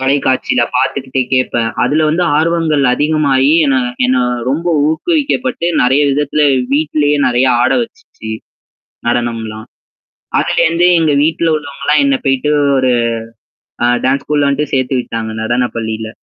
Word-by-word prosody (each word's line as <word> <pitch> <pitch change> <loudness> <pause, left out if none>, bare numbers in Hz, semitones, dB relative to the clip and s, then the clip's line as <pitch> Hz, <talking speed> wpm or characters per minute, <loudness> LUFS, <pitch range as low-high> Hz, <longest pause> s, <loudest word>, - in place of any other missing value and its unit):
தொலைக்காட்சில 130 -1 +1 0.2
பாத்துக்கிட்டே 130 -1 -1
கேட்பேன். 120 -3 0
அதுல 150 +5 +1
வந்து 170 +3 0
ஆர்வங்கள் 160 -3 +1
அதிகமாகி 145 -2 +1
என்ன 135 -1 +2 0.3
என்ன 130 - +1 0.3
ரொம்ப 160 +5 -2 0.2
ஊக்குவிக்கப்பட்டு 255 - -1 0.2
நெறைய 130 +4 +3
விதத்தில 145 +2 0 0.3
வீட்லேயே 150 0 +1
நெறைய 125 +1 +2 0.2
ஆட - - +2
வச்சுச்சு. 235 - -10 0.8
நடணம்லாம். 115 -2 -3 0.7
அதுலேருந்து 170 +2 +1
எங்க 160 -2 +1
வீட்ல 165 +1 0
உள்ளவங்கலாம் 145 - -1
என்ன 275 0 +2
போயிட்டு 135 +2 +1 0.3
ஒரு, 130 -1 +2 0.9
ஆ - - +2 0.2
டான்ஸ் 135 +2 0
ஸ்கூல 145 -1 +1
வந்துட்டு 140 +1 -1
சேர்த்து 130 0 0
விட்டாங்க. 115 -2 -5
நடன 120 +2 0
பள்ளில. 110 -1 -4
140 Hz, 120 wpm, -14 LUFS, 125-155 Hz, 0.9 s, நெறைய